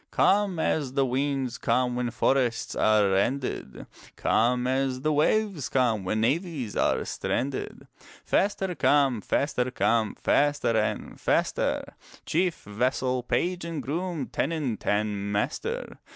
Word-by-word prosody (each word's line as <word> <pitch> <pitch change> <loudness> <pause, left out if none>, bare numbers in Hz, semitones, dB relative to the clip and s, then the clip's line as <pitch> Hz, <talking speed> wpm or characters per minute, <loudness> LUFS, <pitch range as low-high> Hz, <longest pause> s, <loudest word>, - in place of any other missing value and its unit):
Come 200 -2 +2
as 150 -4 0
the 135 0 +2
winds 130 -1 -1
come 125 -1 +1
when 125 -1 -1
Forests 120 0 0
are 105 -2 +3
rended; 125 +8 -1 0.3
Come 125 +2 +2
as 130 0 0
the 155 +2 +1
waves 175 +1 +1
come 120 -6 +1
when 110 +4 -1
Navies 140 - -1
are - - +1
stranded: 135 +1 -3 0.4
Faster 195 -2 +1
come, 140 -5 +3
faster 130 +2 0
come, 115 -3 +1
Faster 145 -5 +1
and 110 -1 -2
faster, - - +1 0.4
Chief, 175 +1 0
vassal, 125 +4 -1
page 175 +8 -1
and 165 -4 -4
groom, 165 +2 -3
Tenant 140 -8 -2
and 105 -1 0
master. 105 0 -3
130 Hz, 125 wpm, -27 LUFS, 115-150 Hz, 0.4 s, are